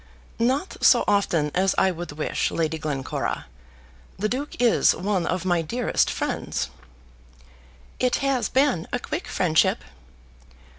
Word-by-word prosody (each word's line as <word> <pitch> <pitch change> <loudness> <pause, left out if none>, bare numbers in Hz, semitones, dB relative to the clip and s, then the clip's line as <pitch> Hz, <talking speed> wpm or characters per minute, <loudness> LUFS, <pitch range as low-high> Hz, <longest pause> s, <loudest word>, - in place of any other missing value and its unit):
"Not 260 +10 0
so - - +6
often 175 -7 +1
as 190 +1 +2
I 190 - +4
would 175 -3 -6
wish, 150 +1 -1
Lady 160 -1 -1
Glencora. 145 -4 -3 0.7
The 210 - 0
Duke 275 +5 -4
is 240 -2 +4
one 190 -2 -1
of 185 0 -2
my 175 -2 +2
dearest 235 +9 0
friends." - - -2 1.3
"It 250 -1 +2
has 270 -3 0
been 260 - +2
a - - 0
quick 310 +7 -5
friendship." 160 -4 +2
190 Hz, 130 wpm, -24 LUFS, 165-245 Hz, 1.3 s, so